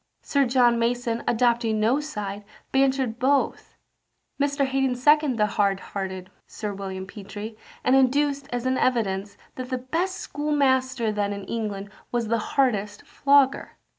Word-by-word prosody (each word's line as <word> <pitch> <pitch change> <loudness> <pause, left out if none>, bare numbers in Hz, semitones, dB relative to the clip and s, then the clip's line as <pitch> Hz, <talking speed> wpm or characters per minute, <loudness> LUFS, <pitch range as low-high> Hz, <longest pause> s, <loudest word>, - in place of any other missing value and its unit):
Sir 280 -1 +2
John 240 -1 +4
Mason, 235 0 -1
adopting 235 -2 +2
no 230 +6 +3
side, 210 -9 -5 0.3
bantered 265 -3 +1
both. 275 +2 0 0.7
Mr. 280 0 +1
Haddon 265 -1 0
seconded 295 0 +3
the 210 - +3
hard 200 -2 +1
hearted 190 -1 -5 0.2
Sir 210 -2 -5
William 190 -1 -6
Petre, 205 +2 -8 0.3
and 255 - +4
adduced, 280 +1 +2
as 245 0 -3
an 260 0 +1
evidence, 200 -5 0 0.2
that 255 -1 -5
the 255 - -1
best 330 +9 -2
schoolmaster 260 -5 0
then 205 -1 -1
in 200 0 -6
England 205 -2 -4 0.2
was 235 -2 -1
the 230 0 +2 0.2
hardest 210 -6 +1
flogger. 280 -1 +2
240 Hz, 140 wpm, -25 LUFS, 210-270 Hz, 0.7 s, John